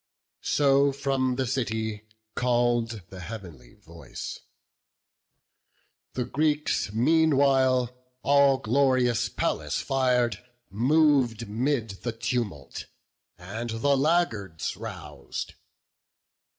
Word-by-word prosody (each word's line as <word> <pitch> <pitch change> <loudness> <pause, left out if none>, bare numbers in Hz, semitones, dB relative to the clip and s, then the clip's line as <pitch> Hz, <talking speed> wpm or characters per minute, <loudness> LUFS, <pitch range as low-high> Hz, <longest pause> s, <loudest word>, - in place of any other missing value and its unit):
So 140 -1 +4
from 135 -2 0
the 130 0 -1
city 110 -4 -2 0.3
call'd 120 -3 0
the 95 - -10
heav'nly 90 - -9
voice; 85 -5 -9 1.7
The 125 - -2
Greeks, 150 -6 0
meanwhile, 130 -1 +3 0.3
all 140 -1 +5
glorious 125 -2 +2
Pallas 75 -1 -1
fir'd, 125 -5 +1 0.3
Mov'd 125 -1 +2
'mid 115 -2 -1
the 120 - -3
tumult, 115 - -4 0.5
and 110 +7 -6
the 115 +6 +1
laggards 135 - 0
rous'd. 70 -2 -7
120 Hz, 85 wpm, -26 LUFS, 110-135 Hz, 1.7 s, all